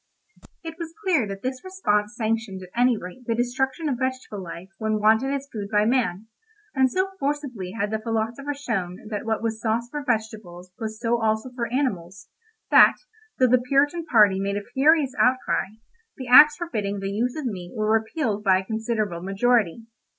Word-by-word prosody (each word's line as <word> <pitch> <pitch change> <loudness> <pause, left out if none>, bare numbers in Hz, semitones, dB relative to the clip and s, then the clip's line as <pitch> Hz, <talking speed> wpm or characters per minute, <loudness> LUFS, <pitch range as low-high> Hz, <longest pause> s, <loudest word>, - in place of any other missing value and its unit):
It 325 0 -8
was 330 -1 -7
clear 330 - +2
that 195 0 -7
this 255 0 -4
response 240 - -1
sanctioned 220 -4 -2
at 180 - -12
any 245 -1 +3
rate 210 +7 -10
the 230 - +1
destruction 265 +6 -1
of 260 -4 -1
vegetable 260 -6 -3
life 175 +1 -9
when 215 -1 0
wanted 220 +5 +3
as 280 0 -3
food 205 -3 -4
by 210 0 +3
man; 225 -5 0 0.5
and 265 -2 +3
so 375 +1 0
forcibly 275 -10 -3
had 210 -1 -2
the 220 - -1
philosopher 230 +6 -3
shown 195 -10 -3
that 210 0 -4
what 220 0 -1
was 225 -1 -2
sauce 230 +1 -1
for 295 -1 -4
vegetables 215 -7 -4
was 220 -1 -5
so 235 0 0
also 220 +3 0
for 240 -2 -4
animals, 195 -9 -3 0.4
that, - - +8 0.4
though 255 - +4
the 250 0 +4
Puritan 285 +6 +1
party 210 -10 +4
made 200 +1 -1
a 205 - -5
furious 285 -1 +3
outcry, 255 -5 +2 0.5
the 260 - -6
acts 295 +4 +8
forbidding 210 - -3
the 195 0 -3
use 240 +5 -1
of 305 -3 -5
meat 185 -7 -5
were 215 -1 0
repealed 220 -1 -1
by 190 -2 +4
a 190 - -4
considerable 220 -5 -2
majority. 215 +1 +1
225 Hz, 180 wpm, -24 LUFS, 205-260 Hz, 0.5 s, that